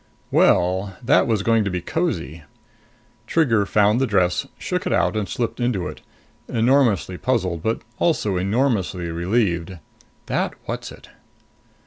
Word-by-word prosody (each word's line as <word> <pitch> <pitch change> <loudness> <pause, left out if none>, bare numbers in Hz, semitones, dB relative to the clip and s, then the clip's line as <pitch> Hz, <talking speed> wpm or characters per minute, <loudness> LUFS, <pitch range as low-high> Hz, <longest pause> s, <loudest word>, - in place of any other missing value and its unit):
Well, 95 +2 +2
that 120 - +4
was 110 -4 +1
going 115 0 +3
to 100 - -1
be 90 -1 -2
cosy! 85 - -3 0.9
Trigger 115 -11 +2
found 105 +4 +3
the 135 - +2
dress, 90 -4 +1
shook - - -3
it - - -1
out - - +1
and 105 -2 -2
slipped 115 -1 -3
into 115 -8 0
it, - - -9 0.5
enormously 115 -6 +2
puzzled 95 -10 0
but 110 +5 -2 0.2
also 110 - +1
enormously 95 -3 0
relieved. 85 -1 -1 0.5
That - - -1
Whatzzit! - - -7
105 Hz, 130 wpm, -22 LUFS, 90-120 Hz, 0.9 s, that